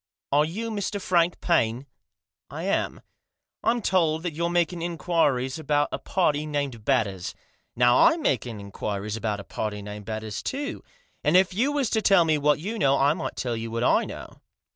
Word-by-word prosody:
Are 145 +2 +4
you 220 +8 -4
Mr. 205 -1 -2
Frank 175 -2 +2
Paine? 125 -7 +1 0.2
" - - -62
" - - -66
I - - -6
am." - - -1 0.6
"I'm 235 -1 +1
told 165 -4 +2
that 175 -3 -3
you're 170 +2 -1
making 175 0 0
inquiries 160 -6 0
about 145 -1 +1
a - - -3
party 155 -5 0
named 140 -7 -3
Batters; 105 -8 0 0.4
now 120 0 +4
I'm 330 -1 +5
making 120 - -1
inquiries 100 +1 -4
about 110 -2 -2
a - - -7
party 105 -1 -4
named 105 0 -8
Batters, 110 -1 -4
too; 280 +2 -4 0.4
and 155 +5 +5
if 185 0 +3
you 250 +9 +1
was 280 -6 0
to 220 - +2
tell 195 -5 +5
me 155 -2 +2
what 150 +1 +3
you 210 +8 -4
know, 140 0 +3
I 140 +2 +4
might 165 - -5
tell 120 -3 -2
you 115 0 -4
what 115 +1 -2
I - - +3
know." - - -9
150 Hz, 190 wpm, -25 LUFS, 115-180 Hz, 0.6 s, I'm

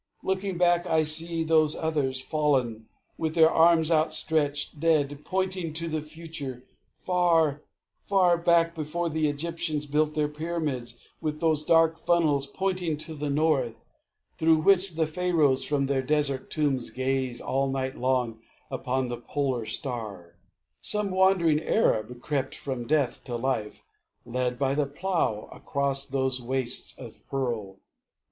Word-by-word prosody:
Looking 190 -1 -1
back, 175 0 +3
I 160 -1 +3
see 165 +2 +1
Those 155 -1 +3
others, 145 -5 -1
fallen, 130 -7 0 0.3
with 160 -1 -2
their 160 -1 +6
arms 165 0 +4
outstretched 155 -2 0
Dead, 145 -3 +2
pointing 185 -3 -2
to 165 +1 -1
the 155 -1 -2
future. 150 -5 -7 0.3
Far, 165 -5 +2 0.4
far 185 -3 +3
back, 170 -1 +3
Before 165 +2 -3
the 155 -1 +1
Egyptians 155 0 -2
built 150 +1 0
their 150 -1 +1
pyramids 150 -6 -4 0.2
With 155 -1 -3
those 155 -3 +1
dark 165 0 +4
funnels 150 -5 +2
pointing 180 0 -2
to 155 +2 -6
the 150 -1 -4
north, 140 -5 +1 0.6
Through 160 -1 +4
which 195 -2 +4
the 160 0 +2
Pharaohs 155 -5 +2
from 145 -2 0
their 135 -1 0
desert 140 -1 0
tombs 140 -6 0
Gaze 130 -1 -2
all 135 0 -1
night 130 0 -2
long 125 -3 0 0.3
upon 130 0 -1
the 120 0 -4
Polar 125 -2 -2
Star, 105 - -5 0.5
Some 210 -2 0
wandering 185 -5 +3
Arab 120 - +1
crept 135 -3 -2
from 130 -4 -5
death 145 -5 +1
to 125 -2 -4
life 120 -3 -2 0.4
Led 125 0 -2
by 135 0 +1
the 145 0 0
Plough 155 - -1
across 140 0 -2
those 130 -2 0
wastes 130 0 -2
of - - -11
pearl.... 115 -8 -3
150 Hz, 140 wpm, -27 LUFS, 130-165 Hz, 0.6 s, their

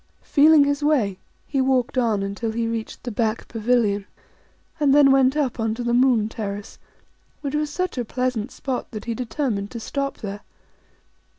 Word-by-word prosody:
Feeling 300 0 +6
his 285 0 0
way, 240 -11 +1 0.3
he 275 -2 0
walked 260 0 +1
on 225 -5 +1
until 205 +3 -3
he 230 0 -1
reached 230 -1 -4
the 245 - -4
back 220 +1 -1
pavilion, 220 -3 +1 0.7
and 285 -2 +4
then 285 -2 +7
went 270 +1 +4
up 265 -5 -1
on 225 0 0
to 245 - -4
the 240 0 0
Moon 245 -4 +4
Terrace, 205 -2 -6 0.6
which 280 -1 -4
was 300 0 0
such 365 -2 -2
a - - 0
pleasant 250 -1 -2
spot 260 -3 -4
that 215 -2 -7
he 235 - -2
determined 225 -3 -2
to 235 - -7
stop 275 +4 -3
there. 200 -1 -6
245 Hz, 175 wpm, -23 LUFS, 220-275 Hz, 0.7 s, then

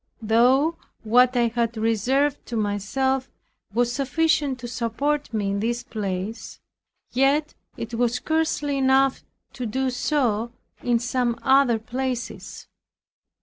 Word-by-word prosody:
Though 255 +9 +3 0.3
what 245 +3 +4
I 235 -1 +3
had 235 0 -1
reserved 255 +6 +1
to 240 - -5
myself 255 +6 -1 0.4
was 240 +3 +1
sufficient 285 0 +1
to 240 - -5
support 260 +6 -2
me 205 -3 -1
in 200 - -1
this 240 +3 -1
place; 205 -2 -5 0.5
yet 275 +4 +2 0.2
it 230 +1 -6
was 240 +1 +1
scarcely 295 -1 0
enough 265 0 +3 0.3
to 250 - -4
do 260 +4 -1
so 240 -4 0 0.3
in 240 -1 +2
some 240 0 -1
other 265 -3 +4
places. 250 +2 -5
245 Hz, 120 wpm, -24 LUFS, 230-270 Hz, 0.5 s, what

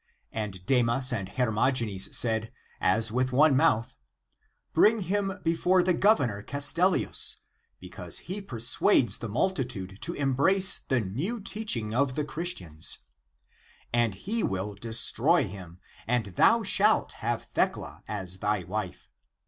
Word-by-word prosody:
And 100 -4 -6
Demas 125 0 +2
and 100 -5 -4
Hermogenes 115 -4 0
said 110 -1 0 0.3
<as 110 0 +3
with 130 +2 -1
one 145 +3 +4
mouth>2^ 130 -6 +1 0.8
"Bring 220 0 +4
him 195 +1 -2
before 175 +2 +2
the 180 0 +2
Gov 210 +6 +4
ernor 105 -6 -3
Castellius, 165 - +1 0.4
because - - -6
he 200 +3 -5
persuades 120 - +1
the 115 - -6
multitude 120 - -3
to 170 - -3
embrace 145 +8 +4
the 130 -3 -1
new 140 - -4
teaching 195 - -2
of 130 +1 0
the 150 - -2
Christians, 95 - -2 1.0
and 120 -4 +1
he 220 - -3
will 95 - -3
destroy 115 - +2
him, 90 -3 -11 0.3
and 120 -1 0
thou 230 - +4
shalt 210 +2 +2
have 120 +1 -2
Thecla - - -3
as 95 -3 -5
thy 105 -2 -1
wife. - - -6
125 Hz, 130 wpm, -27 LUFS, 105-175 Hz, 1.0 s, one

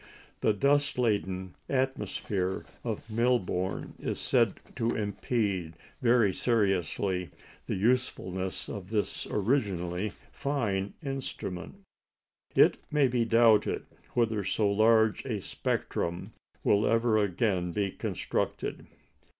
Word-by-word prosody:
The - - +3
dust 145 +7 +2
laden 95 -6 0 0.2
atmosphere 105 -7 -1 0.2
of - - -4
Melbourne 110 -5 0
is - - -3
said - - +3 0.2
to 115 +1 0
impede 100 -5 -1 0.3
very 120 -5 +4
seriously 95 -5 0 0.4
the - - -1
usefulness 95 -4 0
of 95 -3 -6
this 105 -2 -1
originally 100 -5 0 0.2
fine 105 -9 -1
instrument. 135 - -5 0.7
It - - +6
may 150 -2 +4
be 120 -1 +1
doubted 115 -2 +4 0.3
whether 110 -4 +2
so 100 +1 +1
large 110 +1 +4
a 115 -6 -2
spectrum 85 -2 -2 0.3
will 105 +1 +3
ever 115 -1 +3
again 95 -2 +1
be 100 0 -1
constructed. - - -3
105 Hz, 100 wpm, -29 LUFS, 95-120 Hz, 0.7 s, It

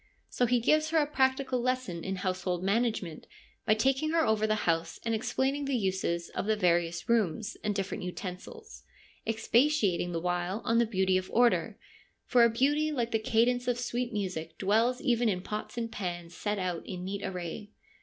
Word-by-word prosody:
So 245 - +1
he 245 +1 +3
gives 310 +6 +3
her 325 - +1
a 305 - +4
practical 265 -3 +1
lesson 255 -9 -2
in 190 - -2
household 185 -1 -2
management 200 -5 -1 0.4
by 215 - +5
taking 265 +7 +1
her 330 -1 +3
over 215 0 +2
the 215 0 0
house 165 0 0
and 230 - 0
explaining 265 +5 0
the 275 -1 0
uses 190 -4 -1
of - - -4
the 220 - +3
various 175 -3 +1
rooms 220 -2 +1
and 210 -1 -1
different 195 -1 -3
utensils, 190 - -7 0.5
expatiating 225 - +2
the 165 - -1
while 180 +4 -2
on 230 -1 +3
the 235 - +3
beauty 190 -3 +2
of 185 - -9
order 240 0 +2
— - - -26
' - - -47
for 245 -1 +5
a 235 - +6
beauty 290 +6 +2
like 240 -5 -1
the 225 - +2
cadence 240 +3 +1
of 245 -1 +1
sweet 245 0 -2
music 185 -7 -4
dwells 225 +6 +2
even 240 -4 +2
in 180 -3 -1
pots 215 +3 -5
and 230 -1 -3
pans 175 -5 -5
set 210 0 -2
out 180 -3 -2
in 180 -1 -5
neat 200 +1 -4
array.' 180 +3 -5
220 Hz, 190 wpm, -30 LUFS, 185-245 Hz, 0.5 s, a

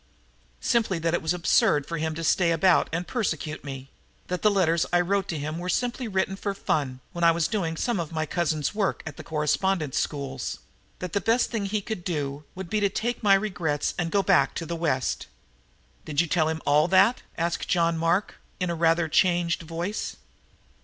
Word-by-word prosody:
"Simply 225 -6 +1
that 165 0 -1
it 175 - +1
was 160 - 0
absurd 160 -4 +3
for 165 -2 -4
him 160 0 -2
to 165 - -4
stay 170 +1 +3
about 170 +2 +3
and 175 +2 -2
persecute 175 -7 -2
me; 135 -1 -7 0.4
that 180 0 -2
the 210 - +5
letters 170 -5 +2
I 175 - +4
wrote 195 +2 0
him 155 0 -3
were 180 +1 -4
simply 245 +5 -1
written 190 -1 0
for 200 0 -3
fun, 130 -8 -1
when 170 - -4
I 170 - +7
was 165 -1 +2
doing 170 -7 -2
some 235 0 0
of 165 -2 -4
my 155 -1 -1
cousin's 155 -1 -1
work 205 -2 -1
at 160 - -7
the - - -8
correspondence 155 0 0
schools; 135 -3 -3 0.4
that 180 -2 -6
the 200 - +1
best 230 +2 +2
thing 220 -4 -1
he 210 +1 -1
could 210 -3 -5
do 145 -4 -3
would 190 -1 -6
be 215 +4 0
to 200 -1 +2
take 235 +5 -2
my 200 -3 +6
regrets 175 -8 -1
and 170 -1 0
go 200 +2 +2
back 170 -10 +3
to 165 - -3
the 170 - -3
West." 150 -6 -1 0.8
"Did 150 -2 -3
you 175 - +4
tell 160 -1 +1
him 160 0 -3
all 150 +2 +4
that?" 195 +7 +4 0.2
asked 170 0 -1
John 170 -1 +2
Mark 165 +4 0 0.2
in 180 -2 0
a - - -1
rather 165 0 +2
changed 170 +1 +2
voice. 170 +5 -4
170 Hz, 200 wpm, -26 LUFS, 160-195 Hz, 0.8 s, I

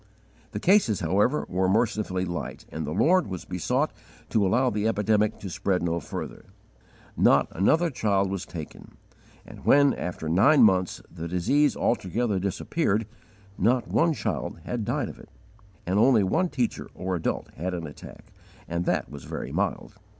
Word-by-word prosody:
The 105 - -4
cases, 135 - +3
however, 100 - +1
were 95 +1 0
mercifully 105 -3 0
light, 85 -1 -5
and 80 -2 -4
the - - -3
Lord 165 - +3
was 90 -2 -6
besought 125 - -1 0.4
to 110 -3 +3
allow 125 +6 +2
the 105 +1 0
epidemic 105 0 +1
to 100 - -5
spread 90 +1 -1
no 85 0 0
further. 75 - -7 0.7
Not - - +4
another 160 - +2
child 100 -6 +1
was 95 -2 -3
taken; 80 -4 -10 0.5
and - - -12
when, 140 0 +5
after 85 -3 -5
nine 120 - +5
months, 95 -4 +2
the 85 -1 -6
disease 135 - +2
altogether 110 -1 0
disappeared, 105 - -1 0.5
not 125 +1 +2
one 165 0 +3
child 115 - -3
had 120 -3 -3
died - - -1
of - - -10
it, - - -14 0.6
and 95 +3 +1
only 115 -2 +5
one 175 - +1
teacher 125 -7 -2
or 95 0 -2
adult 85 - -2
had 80 - -6
had 95 - -1
an 85 -2 -5
attack, 75 - -12 0.3
and 85 +1 -2
that - - 0
was 70 -3 -10
very - - -5
mild. - - -2
100 Hz, 165 wpm, -26 LUFS, 90-125 Hz, 0.7 s, when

